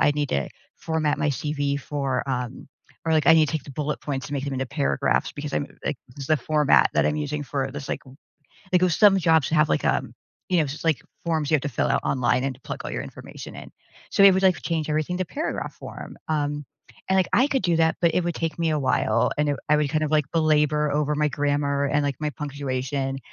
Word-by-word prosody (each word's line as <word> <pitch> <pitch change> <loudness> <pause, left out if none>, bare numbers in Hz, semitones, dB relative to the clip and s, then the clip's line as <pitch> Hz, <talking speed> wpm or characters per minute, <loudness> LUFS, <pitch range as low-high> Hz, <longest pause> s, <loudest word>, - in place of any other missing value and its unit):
I - - +5
need 145 -1 -1
to 70 - 0 0.3
format 160 -2 0
my 150 - +1
CV 145 0 -1
for, 140 -2 -2
um" 125 -1 -4 0.4
Or, 160 - +2
like, 155 -3 +2
"I 165 - +8
need 155 -1 +5
to - - -4
take 155 -5 -2
the - - -10
bullet 150 +2 -3
points 135 -3 -4
and - - -8
make 135 - -2
them 140 - -3
into 130 0 -1
paragraphs," 140 +2 0
because 145 0 -6
I'm, 145 - -1 0.2
like, 150 - -1
this 135 +3 -10
is - - -8
the 155 - +3
format 150 +1 +3
that - - +3
I'm 150 - 0
using 150 0 -2
for 135 -1 -2
this 140 0 -7
like - - -2 0.7
like 180 - +4
with 180 -1 +3
some 205 +1 +6
jobs 160 -5 +3
have 155 -1 +3
like, - - 0
um, - - 0 0.4
you 180 -2 +2
know, 155 - +3
just 140 +2 -6
like 160 -6 +2 0.2
forms 160 -3 0
you - - +3
have 140 - -4
to 145 - -1
fill 125 - 0
out - - +2
online, 125 -1 +1
and 135 -2 -3
plug - - -6
all - - -4
your - - -2
information - - -10
in, - - -10 0.4
so, 200 - +3
it 195 - +9
would, 190 - +1
like, 185 -3 +4
change 160 -2 -2
everything 155 +4 -1
to 185 - 0
paragraph 295 - -4
form, - - -9
um, 145 -1 -1 0.4
and 190 - +3
like 185 - +2
I 260 - +5
could 270 -7 0
do 175 -2 +2
that, 160 0 +2
but 170 -2 +3
it 180 - +1
would 175 -1 -1
take 165 0 -3
me 165 -1 +1
a 155 - +1
while, 125 -4 +2
and 150 0 +2
it 145 - -1
I 150 - +5
would 150 -1 +1
kind 155 0 +1
of, 150 - -2
like, 150 -2 +3
belabor 150 -2 +2
over 150 0 +1
my 150 0 +1
grammar, 145 0 0
and, 145 +1 +1
like, 140 -2 -1
my 150 -1 -1
punctuation. 135 -2 -3
150 Hz, 250 wpm, -24 LUFS, 140-160 Hz, 0.7 s, it